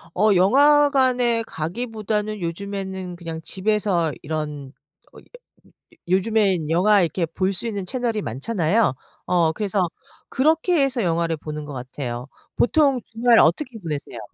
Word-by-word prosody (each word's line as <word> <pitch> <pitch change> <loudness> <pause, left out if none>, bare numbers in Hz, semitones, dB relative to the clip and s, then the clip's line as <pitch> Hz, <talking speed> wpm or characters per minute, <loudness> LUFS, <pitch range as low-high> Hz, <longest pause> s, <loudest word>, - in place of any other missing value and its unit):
어 210 -2 +4
영화관에 260 +1 +4
가기보다는 215 +4 -3
요즘에는 190 +1 -5
그냥 165 -2 -6
집에서 190 -4 0
이런 150 -3 -5 1.3
요즘에는 190 -3 +1
영화 195 +4 +4
이렇게 170 +1 0
볼 185 +4 -1
수 185 - -6
있는 200 -4 -4
채널이 235 -1 -2
많잖아요? 170 - 0 0.3
어 175 -3 +2
그래서 195 -1 -1 0.4
그렇게 320 +3 +2
해서 265 -3 0
영화를 165 -1 0
보는 150 0 -6
것 145 - -8
같아요. 125 -1 -6 0.3
보통 275 0 +3
주말 230 +1 +3
어떻게 230 - +2
보내세요? 150 - -6
195 Hz, 295 characters per minute, -22 LUFS, 165-230 Hz, 1.3 s, 어